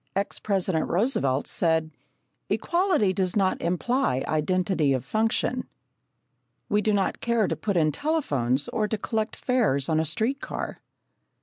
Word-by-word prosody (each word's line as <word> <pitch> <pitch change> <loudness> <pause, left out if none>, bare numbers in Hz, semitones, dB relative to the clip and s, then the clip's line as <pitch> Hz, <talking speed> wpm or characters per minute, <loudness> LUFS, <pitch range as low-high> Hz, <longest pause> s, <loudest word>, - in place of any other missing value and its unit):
Ex 200 +1 -2
President 190 -5 0
Roosevelt 175 - +1
said: 160 -2 +1 0.6
"Equality 345 - +2
does 185 -1 0
not 190 -3 +1
imply 180 - 0
identity 160 -1 +1
of 130 -1 -2
function." 225 - 0 1.0
We 210 - +2
do 215 - +1
not 200 -2 0
care 235 -3 +2
to - - -1
put 200 -4 -1
in 155 -2 +3
telephones 145 - 0
or 215 -1 0
to 220 - -2
collect 220 +1 -2
fares 215 - +1
on 160 -1 +2
a 160 - +1
street 225 - -1
car. - - -5
195 Hz, 140 wpm, -26 LUFS, 155-225 Hz, 1.0 s, in